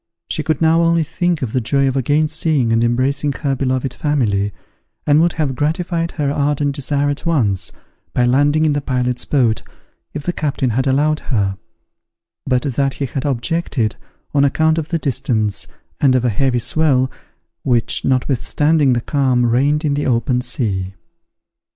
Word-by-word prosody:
She -, -, +1 dB
could 160 Hz, +1 st, -1 dB
now 165 Hz, +1 st, +4 dB
only 165 Hz, -1 st, +3 dB
think 175 Hz, 0 st, -1 dB
of 115 Hz, -, -4 dB
the 130 Hz, -, +1 dB
joy 135 Hz, +4 st, +1 dB
of 130 Hz, -, -1 dB
again 145 Hz, +4 st, +2 dB
seeing 150 Hz, -6 st, +1 dB
and 115 Hz, 0 st, +2 dB
embracing 135 Hz, +5 st, +1 dB
her 140 Hz, -1 st, -2 dB
beloved 130 Hz, -1 st, -1 dB
family, 110 Hz, -10 st, 0 dB, 0.5 s
and 150 Hz, +1 st, +4 dB
would 170 Hz, 0 st, +2 dB
have 150 Hz, -4 st, -1 dB
gratified 165 Hz, +4 st, -1 dB
her 145 Hz, -3 st, -1 dB
ardent 145 Hz, 0 st, 0 dB
desire 145 Hz, +1 st, 0 dB
at 145 Hz, -, -5 dB
once, 105 Hz, -, 0 dB, 0.4 s
by 125 Hz, -, +1 dB
landing 145 Hz, +5 st, +3 dB
in 150 Hz, -, +2 dB
the 145 Hz, -, -1 dB
pilot's 125 Hz, -2 st, -1 dB
boat, 120 Hz, -6 st, +1 dB, 0.5 s
if 150 Hz, -, -4 dB
the 175 Hz, -, -2 dB
captain 140 Hz, -6 st, -1 dB
had 130 Hz, +5 st, 0 dB
allowed 150 Hz, +3 st, +2 dB
her: 100 Hz, -7 st, 0 dB, 0.9 s
but 125 Hz, -2 st, +1 dB
that 135 Hz, -1 st, -1 dB
he 140 Hz, -, -2 dB
had 130 Hz, +1 st, -4 dB
objected, 135 Hz, -3 st, -1 dB, 0.4 s
on 140 Hz, -1 st, +3 dB
account 160 Hz, +3 st, +2 dB
of 155 Hz, -, -5 dB
the 170 Hz, -, 0 dB
distance, 110 Hz, -9 st, -1 dB, 0.3 s
and 135 Hz, -3 st, +4 dB
of 125 Hz, -1 st, +1 dB
a -, -, +3 dB
heavy 125 Hz, +3 st, +1 dB
swell, 130 Hz, 0 st, +1 dB, 0.5 s
which, 120 Hz, -3 st, +1 dB
notwithstanding 140 Hz, +2 st, +1 dB
the 120 Hz, -, 0 dB
calm, 130 Hz, -2 st, +1 dB
reigned 140 Hz, +6 st, +2 dB
in 145 Hz, -, +1 dB
the 145 Hz, +1 st, -1 dB
open 125 Hz, 0 st, +1 dB
sea. 95 Hz, -7 st, -2 dB
135 Hz, 170 wpm, -18 LUFS, 125-150 Hz, 0.9 s, now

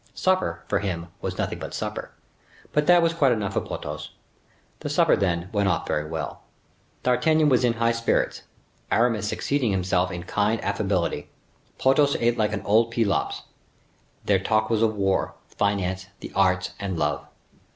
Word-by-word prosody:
Supper, 185 Hz, 0 st, 0 dB
for -, -, +1 dB
him, 85 Hz, -4 st, -3 dB
was -, -, -4 dB
nothing -, -, -2 dB
but -, -, -6 dB
supper; -, -, -4 dB, 0.6 s
but 150 Hz, 0 st, +2 dB
that 175 Hz, -1 st, +6 dB
was 165 Hz, 0 st, +2 dB
quite 145 Hz, -6 st, +3 dB
enough 105 Hz, -3 st, -2 dB
for -, -, +1 dB
Porthos. -, -, -6 dB, 0.7 s
The -, -, -4 dB
supper, -, -, +4 dB
then, 90 Hz, -2 st, -1 dB
went 100 Hz, -2 st, +1 dB
off -, -, 0 dB
very 75 Hz, 0 st, -1 dB
well. 80 Hz, -3 st, -5 dB, 0.6 s
D'Artagnan 155 Hz, +4 st, +3 dB
was 125 Hz, -2 st, +3 dB
in 120 Hz, -2 st, +3 dB
high 115 Hz, 0 st, +1 dB
spirits. 115 Hz, 0 st, 0 dB, 0.5 s
Aramis 110 Hz, -3 st, +2 dB
exceeded 140 Hz, -4 st, 0 dB
himself 90 Hz, -1 st, +1 dB
in 90 Hz, -2 st, -5 dB
kind 105 Hz, +4 st, 0 dB
affability. 95 Hz, -4 st, -1 dB, 0.5 s
Porthos 140 Hz, +2 st, +3 dB
ate 120 Hz, 0 st, +2 dB
like 105 Hz, -1 st, +1 dB
old 115 Hz, +3 st, +4 dB
Pelops. 115 Hz, -4 st, 0 dB, 0.8 s
Their 100 Hz, -2 st, +3 dB
talk 110 Hz, +3 st, +1 dB
was 110 Hz, -1 st, +2 dB
of 110 Hz, -1 st, +2 dB
war, 95 Hz, -2 st, 0 dB
finance, 95 Hz, -2 st, -1 dB
the -, -, -8 dB
arts, 90 Hz, -2 st, +2 dB
and 95 Hz, -3 st, -3 dB
love. 75 Hz, -1 st, -1 dB
105 Hz, 160 wpm, -25 LUFS, 95-120 Hz, 0.8 s, that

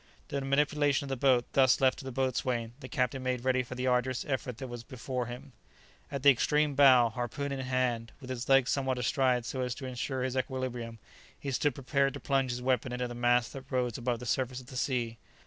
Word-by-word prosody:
The 140 Hz, -, -2 dB
manipulation 145 Hz, +1 st, +2 dB
of -, -, -7 dB
the 135 Hz, -, -1 dB
boat 125 Hz, -1 st, +3 dB
thus 130 Hz, -3 st, +5 dB
left 130 Hz, -1 st, +3 dB
to -, -, -9 dB
the 130 Hz, -, -4 dB
boatswain, 125 Hz, -2 st, -1 dB
the 130 Hz, -2 st, -9 dB
captain 125 Hz, +1 st, -1 dB
made 130 Hz, -1 st, -2 dB
ready 130 Hz, -1 st, +3 dB
for 125 Hz, +1 st, -7 dB
the 125 Hz, 0 st, -3 dB
arduous 125 Hz, 0 st, +1 dB
effort 130 Hz, -4 st, -2 dB
that 130 Hz, 0 st, -6 dB
was 120 Hz, -1 st, -7 dB
before 125 Hz, -1 st, -4 dB
him. 125 Hz, +3 st, -8 dB, 0.6 s
At 140 Hz, -2 st, -4 dB
the 140 Hz, -, +9 dB
extreme 150 Hz, +3 st, +2 dB
bow, 130 Hz, -4 st, +6 dB
harpoon 125 Hz, +5 st, -4 dB
in 135 Hz, -, -3 dB
hand, 125 Hz, -3 st, -1 dB
with 130 Hz, -2 st, -8 dB
his 125 Hz, 0 st, -5 dB
legs 135 Hz, -2 st, +5 dB
somewhat 130 Hz, -2 st, 0 dB
astride 125 Hz, -1 st, +1 dB
so 130 Hz, -, -3 dB
as 125 Hz, -1 st, -2 dB
to 135 Hz, -, -7 dB
insure 130 Hz, +1 st, -3 dB
his 130 Hz, 0 st, -2 dB
equilibrium, 130 Hz, -3 st, -3 dB, 0.4 s
he 140 Hz, -, -4 dB
stood 135 Hz, 0 st, +1 dB
prepared 135 Hz, 0 st, 0 dB
to -, -, -6 dB
plunge 135 Hz, -2 st, +1 dB
his 125 Hz, 0 st, -3 dB
weapon 130 Hz, -1 st, +1 dB
into 125 Hz, 0 st, -2 dB
the 120 Hz, -, -7 dB
mass 120 Hz, 0 st, +2 dB
that 135 Hz, 0 st, -10 dB
rose 125 Hz, -3 st, 0 dB
above 120 Hz, -1 st, -1 dB
the 125 Hz, -, -9 dB
surface 125 Hz, +1 st, -1 dB
of 130 Hz, -, -12 dB
the -, -, -9 dB
sea. 120 Hz, -3 st, -1 dB
130 Hz, 225 wpm, -30 LUFS, 125-135 Hz, 0.6 s, the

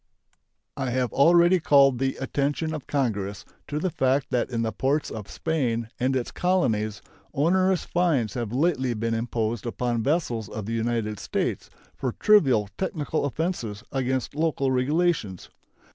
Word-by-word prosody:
I 135 Hz, -2 st, -2 dB
have 125 Hz, 0 st, -1 dB
already 175 Hz, +5 st, +5 dB
called 140 Hz, -5 st, +5 dB
the 135 Hz, 0 st, 0 dB
attention 145 Hz, +4 st, -1 dB
of 155 Hz, -4 st, -6 dB
Congress 105 Hz, -8 st, -2 dB, 0.2 s
to 150 Hz, -, -3 dB
the 180 Hz, +4 st, -1 dB
fact 135 Hz, 0 st, +1 dB
that 125 Hz, 0 st, 0 dB
in 115 Hz, -2 st, -1 dB
the 110 Hz, -, -1 dB
ports 140 Hz, +6 st, 0 dB
of 105 Hz, -3 st, -7 dB
Spain 120 Hz, -8 st, -1 dB
and 130 Hz, +2 st, +1 dB
its 125 Hz, -2 st, -2 dB
colonies 110 Hz, -, 0 dB, 0.3 s
onerous 185 Hz, +5 st, +2 dB
fines 150 Hz, -, +1 dB
have 115 Hz, -4 st, -3 dB
lately 130 Hz, -3 st, +1 dB
been 115 Hz, +1 st, -1 dB
imposed 115 Hz, 0 st, -2 dB
upon 120 Hz, 0 st, -1 dB
vessels 120 Hz, -, -1 dB
of 110 Hz, -2 st, -6 dB
the 115 Hz, -, -3 dB
United 115 Hz, -2 st, -1 dB
States -, -, -2 dB, 0.3 s
for 130 Hz, -3 st, -3 dB
trivial 135 Hz, -, +4 dB
technical 155 Hz, -5 st, -1 dB
offenses 125 Hz, -, -3 dB
against 130 Hz, -1 st, -1 dB
local 145 Hz, -3 st, 0 dB
regulations. 130 Hz, -, 0 dB
130 Hz, 145 wpm, -25 LUFS, 115-155 Hz, 0.3 s, already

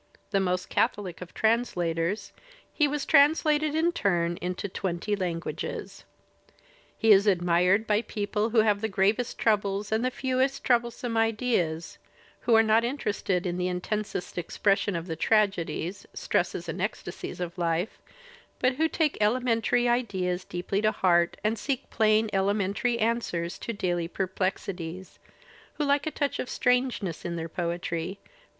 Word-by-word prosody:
The 200 Hz, -, +2 dB
most 180 Hz, -1 st, 0 dB
catholic 185 Hz, -5 st, -1 dB
of 180 Hz, -, -8 dB
translators, 200 Hz, -4 st, 0 dB, 0.4 s
he 300 Hz, -, +3 dB
was 290 Hz, 0 st, -2 dB
translated 305 Hz, 0 st, +4 dB
in 330 Hz, +2 st, +3 dB
turn 175 Hz, -, 0 dB
into 180 Hz, +2 st, -3 dB
twenty 185 Hz, +2 st, -2 dB
languages. 175 Hz, -4 st, -4 dB, 0.9 s
He 225 Hz, -, +4 dB
is 200 Hz, +1 st, +6 dB
admired 180 Hz, +2 st, +3 dB
by 210 Hz, 0 st, +2 dB
people 210 Hz, 0 st, -2 dB
who 225 Hz, -1 st, +4 dB
have 210 Hz, -2 st, +2 dB
the 220 Hz, -, 0 dB
gravest 210 Hz, +4 st, +1 dB
troubles 205 Hz, -2 st, 0 dB
and 220 Hz, +2 st, +1 dB
the 255 Hz, -, +2 dB
fewest 260 Hz, +1 st, -1 dB
troublesome 240 Hz, -1 st, 0 dB
ideas, 215 Hz, -8 st, 0 dB, 0.4 s
who 235 Hz, -, +3 dB
are 225 Hz, -, +7 dB
not 220 Hz, +1 st, +4 dB
interested 210 Hz, -8 st, -1 dB
in 175 Hz, -1 st, -2 dB
the 180 Hz, -, 0 dB
intensest 180 Hz, 0 st, -3 dB
expression 200 Hz, +3 st, +1 dB
of 165 Hz, 0 st, -3 dB
the 165 Hz, -3 st, -4 dB
tragedies, 195 Hz, -3 st, 0 dB
stresses -, -, -1 dB
and -, -, -4 dB
ecstasies -, -, -4 dB
of 175 Hz, -1 st, -4 dB
life, 170 Hz, +4 st, -1 dB, 0.6 s
but 255 Hz, 0 st, +1 dB
who 320 Hz, +1 st, +3 dB
take 315 Hz, -5 st, 0 dB
elementary 240 Hz, +1 st, +2 dB
ideals 190 Hz, -7 st, 0 dB
deeply 180 Hz, +3 st, -2 dB
to 215 Hz, 0 st, +3 dB
heart 175 Hz, -4 st, +2 dB
and 215 Hz, +1 st, 0 dB
seek 275 Hz, +1 st, -3 dB
plain 220 Hz, 0 st, +3 dB
elementary 200 Hz, +4 st, +1 dB
answers 220 Hz, -7 st, -1 dB
to -, -, -4 dB
daily 175 Hz, -5 st, -1 dB
perplexi 190 Hz, 0 st, -2 dB
ties, 175 Hz, +2 st, -8 dB, 0.5 s
who 295 Hz, -, -2 dB
like 285 Hz, +1 st, +2 dB
a -, -, +2 dB
touch 285 Hz, -2 st, -2 dB
of 250 Hz, -, -3 dB
strangeness 250 Hz, -9 st, 0 dB
in 170 Hz, 0 st, -3 dB
their 165 Hz, -1 st, -4 dB
poetry 170 Hz, +1 st, -3 dB
but. -, -, -28 dB
205 Hz, 150 wpm, -27 LUFS, 180-235 Hz, 0.9 s, are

